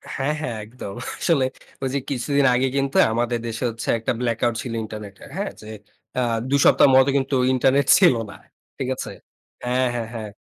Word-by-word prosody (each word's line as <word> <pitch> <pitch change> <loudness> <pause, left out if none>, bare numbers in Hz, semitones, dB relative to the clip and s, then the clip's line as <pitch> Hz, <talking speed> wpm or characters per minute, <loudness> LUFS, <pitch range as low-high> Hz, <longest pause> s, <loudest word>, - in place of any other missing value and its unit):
হ্যাঁ, 140 +3 0
হ্যাঁ, 120 -6 -3
একদম। 105 -3 -9 0.2
আসলে 140 -6 +2 0.4
ঐযে 135 +1 -1
কিছুদিন 140 +1 +1
আগে 130 +2 +2
কিন্তু 135 0 0
আমাদের 120 +1 0
দেশে 115 +2 -4
হচ্ছে 115 0 -7
একটা 115 - -1
ব্লাক 115 -2 -1
আউট 120 -1 +1
ছিল 120 -4 -5
ইন্টারনেট 105 -2 -8
এর। - - -12
হ্যাঁ? 200 0 -2
যে, - - -12 0.5
আ - - +2 0.3
২ 140 0 +3
সপ্তাহ - - +6
মতো 130 +1 +6
কিন্তু 135 0 -1 0.2
ইন্টারনেট 135 +1 +2
ছিল 175 -10 +6
না। - - -10 0.4
ঠিক 130 - -3
আছে? - - -6 0.5
হ্যাঁ, 125 +1 +1
হ্যাঁ, 115 -2 -3
হ্যাঁ। 110 -2 -6
125 Hz, 185 wpm, -22 LUFS, 115-135 Hz, 0.5 s, সপ্তাহ